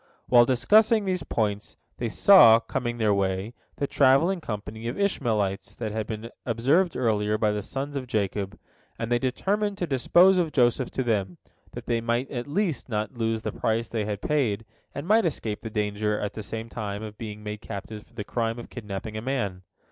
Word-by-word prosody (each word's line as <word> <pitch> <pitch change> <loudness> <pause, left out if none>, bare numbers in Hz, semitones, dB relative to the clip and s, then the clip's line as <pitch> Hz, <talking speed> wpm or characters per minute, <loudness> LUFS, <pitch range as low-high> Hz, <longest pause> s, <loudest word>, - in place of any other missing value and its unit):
While 120 -1 +6
discussing 210 - +4
these 185 -2 -1
points, 105 -2 -2 0.2
they 120 - -2
saw, 115 - +8
coming 120 +1 -3
their 110 -3 +2
way, 95 +2 -1 0.2
the 140 - -1
travelling 140 +8 +3
company 110 -1 -6
of 120 - -4
Ishmaelites 105 - -1
that 110 -3 -4
had 110 0 -3
been 110 +1 -6
observed 140 - +2
earlier 105 -3 +1
by 105 -1 +2
the 105 0 -2
sons 140 +7 -5
of 130 -2 -4
Jacob, 100 -2 -2 0.4
and 115 +1 -4
they 120 - +3
determined 200 +11 -1
to 180 - -1
dispose 175 +7 +4
of 165 -3 0
Joseph 125 -1 +2
to 130 - -2
them, 100 -7 -1 0.4
that - - -8
they 115 -1 0
might 120 +3 -1
at 120 -1 -4
least 170 -3 -1
not 110 +1 -2
lose 115 -1 -1
the - - -2
price 110 +1 -1
they 110 -3 -2
had 105 -1 -4
paid, 115 -8 0 0.3
and 145 +4 -5
might 220 +3 +5
escape 110 -9 -4
the 110 - -5
danger 105 0 -1
at 105 -1 -3
the 110 - -6
same 110 +2 -5
time 105 -2 -5
of 105 -1 -9
being 105 -2 -7
made 105 0 -6
captives 105 +2 -7
for 120 - -27
the 105 - -4
crime 115 +1 -2
of 120 - -9
kidnapping 105 -1 -6
a 110 - -3
man. 110 -8 -2
115 Hz, 195 wpm, -26 LUFS, 105-135 Hz, 0.4 s, saw